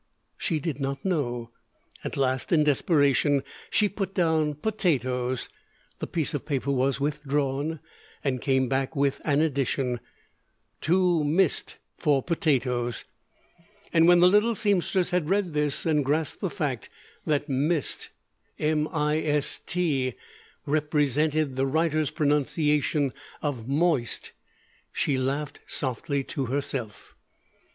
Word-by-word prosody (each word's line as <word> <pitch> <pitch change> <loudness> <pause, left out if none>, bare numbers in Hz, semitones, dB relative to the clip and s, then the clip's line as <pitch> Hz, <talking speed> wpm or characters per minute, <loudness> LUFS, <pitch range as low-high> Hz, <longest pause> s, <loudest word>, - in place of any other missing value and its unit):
She 165 - -1
did 150 -1 -3
not 135 +2 -3
know. 120 -10 -1 0.5
At - - -4
last 130 -1 0
in 160 -3 +5
desperation 145 -1 +3 0.3
she 210 - +3
put 195 -1 -4
down 160 -4 +2
"potatoes." 130 - 0 0.5
The - - -3
piece 165 -2 -1
of 145 - -2
paper 140 -2 -1
was 135 +1 +1
withdrawn, 145 +1 -1 0.4
and 130 -3 -1
came 130 -2 +2
back 135 +3 -1
with 140 -1 +1
an 145 -1 +2
addition: 135 -4 0 0.8
Too 175 -1 +3
mist 160 +3 +1 0.2
for 145 -4 +2
potatos 125 -8 0 0.9
And 165 -1 +6
when 175 0 +7
the 180 - +8
little 210 +5 +4
seamstress 190 -3 +1
had 175 -3 0
read 195 -4 +1
this, 150 -1 0
and 150 -3 +2
grasped 150 +2 -1
the - - 0
fact - - -3 0.4
that 145 -1 +1
"m 150 +1 -2
i 150 0 +1
s 150 -2 -1
t" 140 -8 0 0.5
represented 150 -1 +1
the 135 +1 +2
writer's 155 0 +1
pronunciation 150 -1 +1 0.3
of 130 -6 -3
"moist," 145 -4 0 0.6
she 135 -3 0
laughed 140 +3 -2
softly 140 +2 -1
to 135 -1 -3
herself. 125 -5 -4
145 Hz, 120 wpm, -26 LUFS, 135-160 Hz, 0.9 s, the